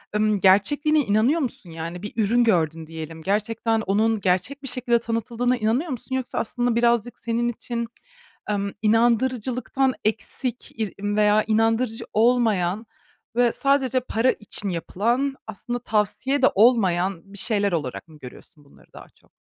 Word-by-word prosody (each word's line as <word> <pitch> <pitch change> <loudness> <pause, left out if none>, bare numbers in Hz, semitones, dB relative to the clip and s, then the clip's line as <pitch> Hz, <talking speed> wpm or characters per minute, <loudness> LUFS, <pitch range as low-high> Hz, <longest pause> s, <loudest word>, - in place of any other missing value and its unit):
ımm, 210 -1 +2
gerçekliğine 290 - +3
inanıyor 235 +6 +2
musun? 230 - -5
Yani 165 +2 -6
bir 210 - -6
ürün 230 +2 +2
gördün 165 -7 +1
diyelim, 160 0 -8
gerçekten 220 +3 0
onun 215 +2 +1
gerçek 195 +10 -1
bir - - -5
şekilde 245 -1 +1
tanıtıldığına 235 +2 -1
inanıyor 235 +9 0
musun 260 +1 -4
yoksa 260 -1 -4
aslında 240 +1 -1
birazcık 235 0 +1
senin 235 0 -1
için, 235 0 -4 0.6
emm, 200 -1 -1
inandırıcılıktan 245 +3 +1
eksik 235 +3 0
ir 215 -3 -2
veya 210 +1 +3
inandırıcı 225 +1 +1
olmayan 220 -4 +2 0.5
ve 245 -1 +3
sadece 270 -1 +1
para 250 0 +1
için 210 -1 -3
yapılan, 235 +10 -1
aslında 240 +3 -5
tavsiye 230 +5 0
de 265 - +6
olmayan 195 -4 +2
bir - - -9
şeyler 205 -2 0
olarak 150 -3 -3
mı 155 - -16
görüyorsun 145 +3 -14
bunları 140 - -22
daha - - -13
çok? - - -30
225 Hz, 140 wpm, -23 LUFS, 200-245 Hz, 0.6 s, de